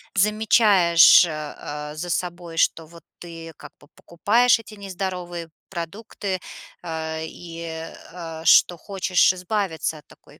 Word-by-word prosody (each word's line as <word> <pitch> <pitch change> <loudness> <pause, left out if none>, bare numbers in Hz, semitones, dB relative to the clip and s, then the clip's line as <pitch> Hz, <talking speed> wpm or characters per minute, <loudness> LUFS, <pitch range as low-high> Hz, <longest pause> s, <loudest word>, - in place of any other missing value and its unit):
замечаешь, 205 -5 +5
э, 170 - -5
э, 150 0 -7
за 175 +3 -5
собой, 175 -1 -4
что 165 -1 +1
вот 170 0 -16 0.2
ты 165 -1 -10
как - - -12
бы 145 - -20
покупаешь 230 +8 +2
эти 220 -1 -13
нездоровые 180 -4 -6 0.2
продукты, 190 +2 -5 0.4
а, 160 -1 -4
и, 170 0 -9 0.5
а, 165 -2 -8
что 175 +2 +5
хочешь 185 -1 +2
избавиться 180 -4 -3
от 145 - -23
такой - - -20
175 Hz, 125 wpm, -23 LUFS, 165-195 Hz, 0.5 s, замечаешь